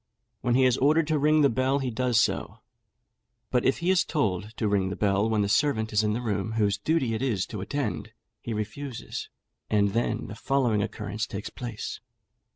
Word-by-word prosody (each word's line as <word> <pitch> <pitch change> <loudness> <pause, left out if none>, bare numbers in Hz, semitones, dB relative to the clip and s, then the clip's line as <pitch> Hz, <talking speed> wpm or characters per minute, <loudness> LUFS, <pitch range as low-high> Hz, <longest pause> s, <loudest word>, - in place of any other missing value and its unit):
When 120 0 +1
he 130 0 +5
is 125 -1 +3
ordered 155 +4 +4
to 155 -2 +2
ring 155 +2 +4
the - - +7
bell, 130 +3 +1
he 130 -3 -2
does 120 0 +2
so; - - -1 0.9
but 125 -2 +2
if 135 - +2
he 175 +2 +1
is 190 - +4
told 105 - -1
to 110 - 0
ring 100 -2 +1
the 95 - -4
bell 100 +1 +1
when 110 -2 +2
the - - 0
servant 110 -1 +1
is 105 - +4
in 105 -1 +1
the 120 +3 -3
room 105 -1 -1
whose 105 -3 +1
duty 155 -8 +1
it 110 - -2
is 115 -9 0
to 105 -4 -6
attend, 110 -2 -3 0.3
he 115 - -5
refuses, 115 +3 -5 0.4
and 100 -1 +3
then 115 +4 -1
the 110 - -7
following 120 -1 +1
occurrence 105 0 -3
takes 100 +1 -6
place. 120 -4 -6
110 Hz, 200 wpm, -27 LUFS, 105-135 Hz, 0.9 s, the